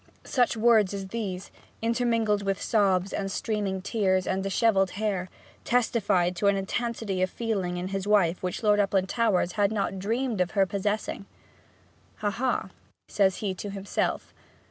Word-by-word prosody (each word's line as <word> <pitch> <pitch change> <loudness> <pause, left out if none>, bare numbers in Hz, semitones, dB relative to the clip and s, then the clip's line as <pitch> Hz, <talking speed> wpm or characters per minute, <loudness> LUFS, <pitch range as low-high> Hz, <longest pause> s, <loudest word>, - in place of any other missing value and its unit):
Such 245 -3 +1
words 220 -3 +4
as 195 -1 -6
these, 195 -4 -4 0.3
intermingled 230 -3 +1
with 195 -1 -1
sobs, 195 -3 +1
and 195 -1 -2
streaming 200 -3 -2
tears, 190 -4 +1
and 190 - -1
dishevelled 195 0 +2
hair, 200 -4 -1 0.3
testified 205 -7 +1
to 200 - +1
an 200 - +4
intensity 205 -1 -2
of 185 - +2
feeling 195 -6 -2
in 180 +1 -3
his 195 0 -3
wife 190 -5 +3
which 180 +4 -3
Lord 210 -1 +4
Uplandtowers 195 -1 +1
had 205 +1 +1
not 195 -2 -1
dreamed 225 +1 -1
of 180 +3 -2
her 195 - +5
possessing. 200 +1 -2 0.9
'Ha, 210 -1 -1
ha!' 240 -2 -1 0.4
says 190 -2 +2
he 195 - 0
to 200 +2 -6
himself. 195 0 -2
200 Hz, 150 wpm, -27 LUFS, 190-220 Hz, 0.9 s, her